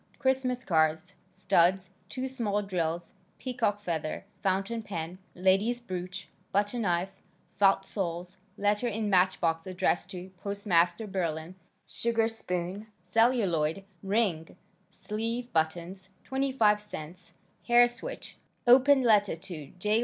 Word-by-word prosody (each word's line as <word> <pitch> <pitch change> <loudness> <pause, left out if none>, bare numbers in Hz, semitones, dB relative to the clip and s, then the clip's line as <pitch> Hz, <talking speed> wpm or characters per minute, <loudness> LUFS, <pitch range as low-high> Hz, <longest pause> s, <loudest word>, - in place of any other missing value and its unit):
Christmas 260 -2 0
cards, 160 +2 +1 0.2
studs, 185 0 +2 0.2
2 260 0 -3
small 215 -6 -1
drills, 170 -3 -2 0.2
peacock 235 -5 -1
feather, 165 -6 -3 0.2
fountain 195 +4 0
pen, 180 -3 -5 0.2
ladies 195 +6 +2
brooch, 185 -4 -6 0.2
butter 205 +4 +1
knife, 185 -2 -1 0.4
felt 195 -1 +4
soles, 180 -3 -4 0.2
letter 205 +4 +1
in 215 -2 -1
match 185 0 +4
box 165 +1 0
addressed 185 0 0
to 185 -1 -8
postmaster 200 -1 +1
Berlin, 170 -4 -3 0.3
sugarspoon, 220 -4 -1 0.2
celluloid, 195 -8 +2 0.2
ring, 195 -5 0 0.3
sleeve 230 +3 -4
buttons, 170 +4 -1
25 260 -6 +2
cents, 180 -3 -9 0.3
hair 240 0 +7
switch, 240 +1 -8 0.3
open 265 +2 +6
letter 210 -5 +4
to 165 -4 -8
J. 210 +4 +2
195 Hz, 110 wpm, -29 LUFS, 175-225 Hz, 0.4 s, hair